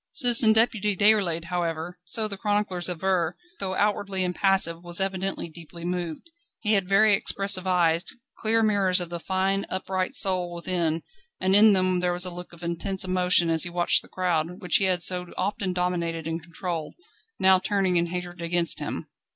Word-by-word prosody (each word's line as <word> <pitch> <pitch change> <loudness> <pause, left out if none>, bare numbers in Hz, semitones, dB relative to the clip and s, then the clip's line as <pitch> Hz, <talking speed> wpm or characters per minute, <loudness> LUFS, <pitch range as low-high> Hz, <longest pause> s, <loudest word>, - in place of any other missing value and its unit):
Citizen 240 -3 +6
Deputy 220 -2 +2
Déroulède, 200 -6 +3
however, 170 0 -4
so 215 +5 0
the 200 - -4
chroniclers 205 -3 -2
aver, 180 -1 -1 0.2
though 190 -1 -3
outwardly 200 -2 -1
impassive, 180 -2 +1
was 175 +1 0
evidently 195 -1 -2
deeply 170 +1 -11
moved. 175 - -4 0.3
He 215 -1 +1
had 195 -2 0
very 210 +2 +4
expressive 195 -1 0
eyes, 170 -2 +2 0.4
clear 225 +1 +1
mirrors 200 -4 +3
of 175 -1 -4
the 170 - -4
fine, 190 +2 -1
upright 185 0 -3
soul 180 -2 +1
within, 170 -2 -1 0.4
and 190 +1 +3
in 210 +1 +7
them 185 -1 +1
there 180 0 0
was 175 +1 -1
a 180 - -5
look 175 0 -9
of 170 0 -14
intense 185 +3 -2
emotion 180 -2 +3
as 160 -1 0
he 175 - -2
watched 175 0 +2
the - - -17
crowd, 180 -1 -2
which 180 -5 +2
he 195 - +1
had 180 -2 0
so 180 +1 0
often 195 0 -2
dominated 170 -3 -2
and 165 +1 -4
controlled, 170 -1 -6 0.4
now 190 0 +4
turning 190 -1 0
in 170 0 +2
hatred 180 0 -6
against 170 0 +1
him. - - -5
180 Hz, 175 wpm, -25 LUFS, 170-195 Hz, 0.4 s, in